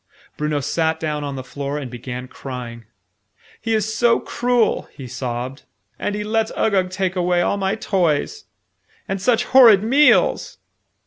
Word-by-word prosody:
Bruno 150 -1 -1
sat 160 +3 0
down 150 -2 -3
on 140 -1 -4
the 130 - -6
floor 140 +2 -5
and 135 -5 -6
began 125 +1 -7
crying. 125 -3 -8 0.8
"He 225 -1 0
is 215 0 -1
so 235 +1 +3
cruel!" 245 -2 0
he 135 - -10
sobbed. 125 +2 -5 0.4
"And 205 - -2
he 210 - -3
lets 220 +1 0
Uggug 190 -4 +1
take 185 0 -2
away 175 -1 +1
all 200 - 0
my 195 +1 0
toys! 190 - -1 0.6
And 195 0 -3
such 245 +3 +2
horrid 235 -6 +6
meals!" 295 - +3
180 Hz, 150 wpm, -20 LUFS, 140-220 Hz, 0.8 s, horrid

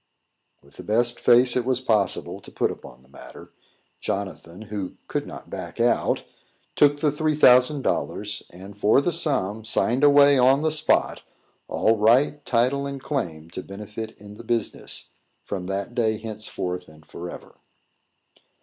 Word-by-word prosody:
With - - -21
the - - -9
best 120 +3 0
face 125 +1 +5
it 125 - +1
was 130 0 0
possible 110 -6 0
to - - -15
put - - 0
upon 60 +1 -12
the - - -24
matter, 65 - -13 0.5
Jonathan, 95 -1 -5
who 100 -3 -5
could - - -3
not - - -10
back - - -7
out, - - +1 0.5
took 145 0 +4
the 150 - +3
three 155 +1 0
thousand 130 0 +5
dollars, 105 0 -2
and, 95 +3 -12
for 105 +4 +4
that 160 +5 0
sum, 110 - 0
signed 120 +4 0
away, 145 -1 +6
on 135 +4 +4
the 155 - +2
spot, 155 0 +1 0.5
all 115 0 +2
right, 130 +7 +3
title, 130 +4 +1
and 140 -1 -6
claim 85 - -4
to 95 - -6
benefit 105 +3 -8
in 105 0 -13
the 115 - -10
business, 115 -1 -3 0.3
from 95 -3 -5
that 100 +4 -3
day 110 -3 +1
henceforth 105 -5 -5
and 75 0 -18
for 85 +2 -8
ever. - - -12
115 Hz, 160 wpm, -24 LUFS, 100-135 Hz, 0.5 s, away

